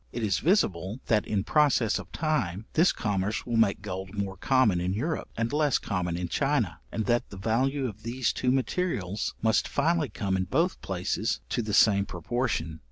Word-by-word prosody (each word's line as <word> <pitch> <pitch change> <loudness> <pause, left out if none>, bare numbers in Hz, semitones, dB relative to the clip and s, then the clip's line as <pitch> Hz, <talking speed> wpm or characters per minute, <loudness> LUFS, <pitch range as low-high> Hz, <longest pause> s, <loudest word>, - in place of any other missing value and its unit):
It 120 - -4
is 100 -3 +1
visible, 105 - +1
that, 110 -3 +1
in 100 -3 0
process 135 -5 +3
of - - -10
time, 110 - -1
this 165 +4 +4
commerce 105 -1 -2
will 120 - -2
make 115 -3 +2
gold 95 +2 -6
more 100 -1 -2
common 120 -5 +2
in 90 +2 -1
Europe, 155 +8 -2
and 115 +3 -1
less 150 -3 +3
common 90 -4 -2
in 90 0 -2
China, - - 0
and 110 - -2
that 120 0 +1
the 100 - -9
value 130 +7 0
of 110 -2 -8
these 120 +2 -1
two 125 - 0
materials 125 - -1
must 110 -1 +3
finally 155 0 +1
come 100 -5 -2
in 95 0 0
both 165 - 0
places 90 -2 -1
to - - 0
the 105 -2 -1
same 100 -2 +5
proportion. 90 -4 -2
110 Hz, 185 wpm, -28 LUFS, 95-130 Hz, -, same